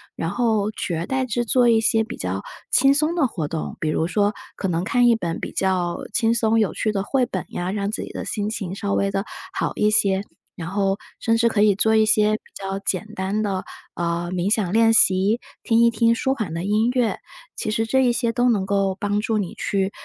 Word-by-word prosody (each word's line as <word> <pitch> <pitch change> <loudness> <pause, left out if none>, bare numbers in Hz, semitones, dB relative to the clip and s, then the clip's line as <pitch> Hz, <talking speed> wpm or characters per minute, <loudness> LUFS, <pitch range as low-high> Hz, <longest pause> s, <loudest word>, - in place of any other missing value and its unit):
然 165 - -3
后， 220 -1 +1
取 180 - -4
而 165 +2 -3
代 265 -1 0
之 240 0 -1
做 245 +1 +3
一 225 -1 +4
些 225 0 +3
比 220 - -7
较， 95 +1 -4 0.3
轻 270 +2 +5
松 305 +4 +1
的 325 -5 +2
活 170 - -3
动， 160 0 -4
比 155 - -1
如 160 - 0
说， 205 +2 +1 0.2
可 195 - -3
能 175 -1 -1
看 245 +4 +3
一 235 - +5
本 170 -6 -3
比 - - -5
较 180 -2 0 0.2
轻 225 0 +2
松 225 -1 +2
有 210 - +1
趣 215 - 0
的 195 -2 -2
绘 255 +4 +1
本 185 -6 -4
呀， 180 +2 -3
让 200 -1 -2
自 - - -4
己 - - -8
的 - - -5
心 210 -1 -2
情， 195 -4 -4
稍 200 -1 -2
微 200 - +1
的 195 +1 -2 0.3
好 - - -2
一 210 - +2
些， 200 -2 +2 0.3
然 170 -1 -6
后 195 0 0 0.2
甚 230 0 +1
至 235 0 +3
可 210 -2 +1
以 210 -2 +5
做 220 +2 +2
一 220 - +5
些 215 0 +3
比 - - -7
较 195 0 -4
简 200 +1 -2
单 195 +1 -1
的， 195 -3 -2 0.3
呃， 170 0 -2
冥 185 +3 +1
想 195 -6 -1
练 225 +1 +4
习， 200 +1 +4 0.2
听 230 -1 +2
一 235 0 +6
听 230 0 +2
舒 265 +3 0
缓 205 -10 -4
的 165 +1 -3
音 215 +4 +1
乐。 250 -3 0 0.4
其 215 - -3
实 225 +1 0
这 265 +3 +3
一 245 - +4
些 235 -1 0
都 245 +1 +2
能 200 -4 0
够 195 -1 +1
帮 205 0 0
助 220 0 0
你 190 -4 -4
去， 195 -1 -1
210 Hz, 255 characters per minute, -22 LUFS, 190-230 Hz, 0.4 s, 一